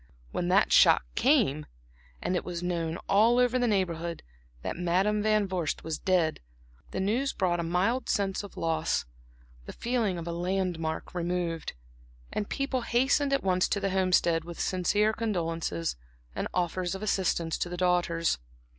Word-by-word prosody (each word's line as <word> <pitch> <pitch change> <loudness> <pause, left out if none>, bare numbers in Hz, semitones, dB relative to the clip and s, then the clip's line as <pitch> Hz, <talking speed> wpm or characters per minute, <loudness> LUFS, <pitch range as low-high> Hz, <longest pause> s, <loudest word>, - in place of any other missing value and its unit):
When 175 - -2
that 190 +3 +3
shock - - +6
came, 225 - +2 0.6
and 185 - 0
it - - -1
was 175 -1 -5
known 170 -2 -1
all 225 +4 +4
over 250 0 +3
the 245 - +2
Neighborhood 170 -5 -1 0.4
that - - -3
Madam 185 +5 +1
Van 215 -1 +2
Vorst 180 -5 -2
was 160 -1 -3
dead, 175 -4 +1 0.5
the - - -4
news 230 +8 0
brought 175 -3 0
a - - 0
mild 185 +10 0
sense 195 -2 0
of 205 -2 -11
loss, 160 - 0 0.6
the - - -7
feeling 230 -6 -1
of 170 - -5
a - - -2
landmark 175 -2 -2
removed; 175 -2 -2 0.6
and 205 - -2
people 275 -2 -1
hastened 265 +4 +2
at 275 - +1
once 185 -1 +2
to 200 - 0
the 195 -1 -1
Homestead 180 -3 +2
with 170 0 -9
sincere 205 +4 +1
condolences 165 - -2 0.4
and - - -2
offers 180 +1 -1
of 190 - -6
assistance 180 -5 0
to 175 - -1
the 180 - -5
daughters. 175 - +1
185 Hz, 160 wpm, -28 LUFS, 170-210 Hz, 0.6 s, shock